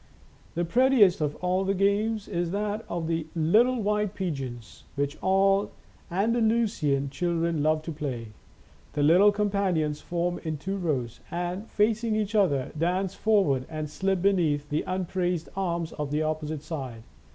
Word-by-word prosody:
The 175 +1 0
prettiest 235 -4 +4
of 150 -1 0
all 185 +1 +1
the 195 +1 0
games 205 +2 +1
is 170 0 -1
that 210 +3 -2
of 170 -1 -2
the 165 -1 -2
" - - -27 0.2
Little 245 +3 +5
White 210 -1 0
Pigeons," 135 - -5
which 145 0 -1
all 195 +1 +3 0.4
Andalusian 205 - +1
children 170 -1 0
love 155 +1 +2
to 165 - -5
play. 130 -7 -4 0.6
The 145 - 0
little 180 +7 +6
companions 195 -7 0
form 175 0 -2
in 160 -2 -3
two 190 +7 -3
rows, 135 - -2
and, 175 +4 -4
facing 220 +1 +1
each 215 -1 -1
other, 170 -11 +2
dance 180 +4 0
forward 195 -13 +2
and 155 -1 -4
slip 190 +4 -1
beneath 160 -7 +2
the 150 - 0
upraised 180 -2 -2
arms 170 -4 -2
of 150 -1 -4
the 150 +2 0
opposite 155 -1 -3
side. 130 -9 -6
175 Hz, 150 wpm, -27 LUFS, 155-200 Hz, 0.6 s, little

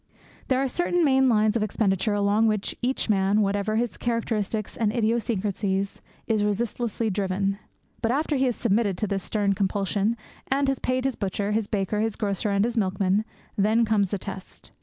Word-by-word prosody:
There 260 - +2
are 270 +1 +1
certain 350 +4 +1
main 265 -2 +4
lines 215 -1 +3
of 230 - +1
expenditure 205 0 +1
along 205 +2 +3
which 210 -2 -1
each 255 +2 0
man, 200 0 +3
whatever 205 +1 0
his 235 +1 -1
characteristics 220 -3 -2
and 215 -2 +1
idiosyncrasies, 210 -4 -1 0.2
is 215 -2 +1
resistlessly 225 +1 -1
driven. 195 +1 -1 0.4
But 225 - +1
after 295 +3 0
he 265 0 +2
has 245 -3 +1
submitted 210 -4 +1
to 215 - 0
this 195 -1 -2
stern 200 0 0
compulsion, 200 +3 0 0.3
and 275 +1 +1
has 270 - -1
paid 255 +1 -1
his 270 -3 0
butcher, 200 +1 -2
his 215 -1 0
baker, 205 0 -1
his 220 0 0
grocer, 205 0 -1
and 200 +1 +2
his 240 0 -2
milkman, 195 0 +1 0.3
then 220 +3 +3
comes 210 -3 +2
the 200 - -1
test. 190 0 -8
215 Hz, 180 wpm, -25 LUFS, 200-235 Hz, 0.4 s, main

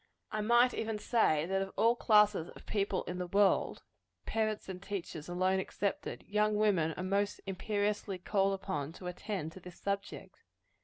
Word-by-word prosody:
I 215 - -1
might 240 +3 +5
even 220 -1 -2
say, 210 -9 +2
that 195 +2 0
of 195 0 -4
all 230 +1 +4
classes 210 -7 +4
of - - -13
people 200 -2 0
in 180 +1 -5
the 180 - -2
world 200 +2 +2 0.4
parents 215 -1 -1
and 185 -1 -6
teachers 175 -6 -5
alone 185 +2 +1
excepted 200 +1 -3
young 210 +1 +2
women 190 -7 +2
are 180 - -3
most 200 +2 0
imperiously 205 0 -1
called 195 +1 +1
upon 160 -6 -4
to 180 - -11
attend 180 -2 -4
to 190 - -11
this 180 -1 -12
subject. 200 0 -4
195 Hz, 165 wpm, -33 LUFS, 180-210 Hz, 0.4 s, might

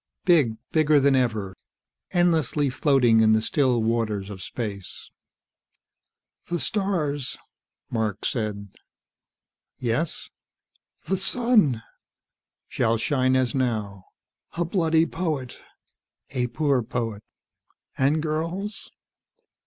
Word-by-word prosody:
Big, 150 - +4 0.2
bigger 155 -2 +4
than 140 0 +4
ever, 110 -7 0 0.5
endlessly 160 -6 +2
floating 125 -4 +3
in 110 0 +5
the 110 - +4
still 120 +1 +1
waters 110 -3 -1
of 95 -2 -8
space. 100 -4 -6 1.4
"The 175 0 -2
stars 155 -11 -1 0.3
..." - - -47
Mark 110 -3 -2
said. 105 -4 -2 1.1
"Yes?" 125 +7 -2 0.7
"The 190 - 0
sun?" 195 - +2 0.4
" - - -65
shall 115 +1 +1
shine 130 +2 +1
as 130 -3 +1
now." 105 -7 -2 0.5
"A 170 +1 -1
bloody 165 -2 +2
poet." 155 -8 -3 0.7
"A 125 -2 0
poor 140 +1 +1
poet." 115 -2 -3 0.7
"And 145 +4 +2
girls?" 170 +6 -3
130 Hz, 100 wpm, -25 LUFS, 115-160 Hz, 1.4 s, in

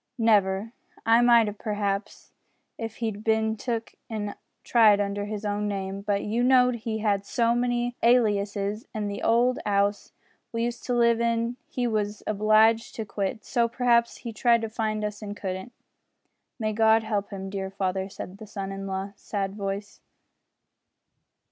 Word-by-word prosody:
"Never. 210 -1 +2 0.3
I 230 +1 +5
might 235 -2 +6
'ave, 210 0 -6
p'r'aps, 205 -2 -3 0.4
if 225 -1 -6
he'd 220 -3 -4
bin 220 0 +1
took 230 0 -4 0.2
an' 210 -2 -3 0.3
tried 215 -4 +5
under 205 0 -1
his 210 0 -5
own 205 0 -1
name, 195 -1 -3
but 200 -1 -1
you 225 +3 -1
know 250 0 +5
he 225 -2 -3
had 205 -2 0
so 230 +3 +1
many 245 0 0
aliases, 210 -3 +2
an' 210 -1 -2
the 200 - -5
old 240 +2 +3
'ouse 200 0 0 0.4
we 230 0 -1
used 240 0 -3
to 245 - 0
live 235 -1 +3
in 230 +1 0 0.2
we 250 - +1
was 210 -2 -1
obliged 215 +2 +3
to 220 - -4
quit, 205 +2 -3
so 235 -3 +1
p'r'aps 235 -1 +2
he 235 -2 -7
tried 235 +2 +3
to 225 - -2
find 215 -1 -2
us 210 0 -5
and 205 -1 -6
couldn't." 190 +4 -5 0.9
"May 215 -2 -1
God 220 +1 +4
help 210 -2 -2
him 195 -2 -6
dear 195 -1 -3
father!" 190 0 -2
said 190 0 -8
the 220 - -9
son 195 -1 -5
in 195 0 -5
a - - -5
low 190 +1 -4
sad 195 -2 -3
voice. 200 0 -5
215 Hz, 165 wpm, -26 LUFS, 200-230 Hz, 0.9 s, might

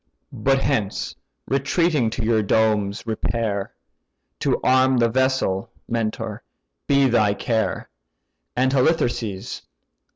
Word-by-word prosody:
But 135 0 +1
hence 95 - -1 0.3
retreating 140 -1 +1
to 115 +1 -4
your 110 -1 +3
domes 105 -1 +1
repair. 110 -2 -2 0.7
To - - +1
arm 130 0 +4
the 115 -1 +3
vessel, 130 -6 0 0.2
Mentor! 110 -2 -3 0.5
be 140 -1 +4
thy 105 -4 +3
care, 110 +1 -1 0.7
And 130 +1 +2
Halitherses! 120 - 0
115 Hz, 100 wpm, -22 LUFS, 105-130 Hz, 0.7 s, arm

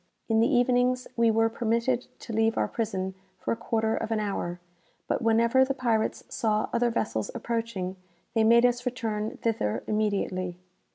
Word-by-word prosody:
In 225 -1 +3
the 230 - +3
evenings 250 +1 +2
we 230 -1 +4
were 225 0 +3
permitted 235 +2 0
to 230 - -7
leave 225 +1 +2
our - - +2
prison 190 -4 -2 0.2
for - - -3
a - - +2
quarter 220 -1 0
of - - -3
an 225 -1 0
hour; 195 -4 -3 0.5
but - - 0
whenever 230 +3 +4
the 270 +1 -1
pirates 230 -4 0
saw 215 -1 0
other 240 0 +2
vessels 160 - -1
approaching, 225 -6 -3 0.4
they 225 - +3
made 235 +2 +6
us 245 0 +2
return 225 -4 -3
thither 215 - 0
immediately. 195 -4 -1
225 Hz, 165 wpm, -27 LUFS, 215-235 Hz, 0.5 s, made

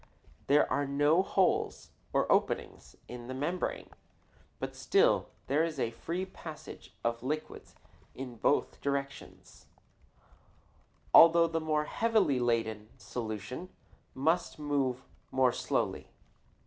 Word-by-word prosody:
There 145 +1 +5
are 140 0 0
no 145 +5 +3
holes, 190 -1 0 0.2
or - - +2
openings, - - 0
in 120 -1 -8
the 130 - -5
membrane, 170 +7 -3 0.7
but - - -5
still 425 +5 +3 0.2
there 150 +3 +2
is 160 -4 -3
a 115 - 0
free 170 +10 -4
passage 165 -4 -10
of 115 0 -1
liquids 150 +5 -5 0.4
in 125 -2 -7
both 145 - +1
directions, 140 -1 -5 1.5
although 170 0 +8
the 165 0 -1
more 155 -1 +1
heavily 215 - +2
laden 115 -3 -1
solution 120 - -6 0.5
must 160 +7 0
move 140 -4 -1 0.3
more 130 -1 +3
slowly. - - -2
140 Hz, 110 wpm, -31 LUFS, 125-165 Hz, 1.5 s, although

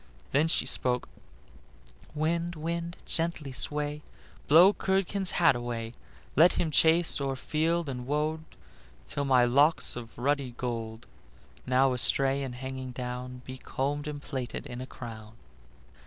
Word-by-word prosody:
Then 150 +4 +3
she 165 - +1
spoke: 125 -1 +3 1.1
"Wind, 170 +3 -1
wind, 170 +2 -4
gently 165 -4 -2
sway, 150 +2 -3 0.5
Blow 175 +7 +7
Curdken's 190 0 0
hat 165 -7 +5
away; 120 -1 -4 0.4
Let 165 +5 +6
him 160 - -1
chase 165 0 +4
o'er 135 -1 -1
field 160 +4 -1
and 125 -2 -5
wold 150 +2 0 0.7
Till 140 - -3
my 130 -2 +4
locks 140 +6 +3
of 115 -1 -9
ruddy 135 -1 -1
gold, 115 -2 -4 0.6
Now 130 +1 +3
astray 135 +3 +3
and 130 -3 -5
hanging 130 0 -6
down, 125 0 -6
Be 130 0 -8
combed 145 +4 -3
and 150 -1 -5
plaited 130 -4 -5
in 120 +1 -7
a 130 - -7
crown." 110 -4 -9
140 Hz, 135 wpm, -28 LUFS, 125-160 Hz, 1.1 s, Blow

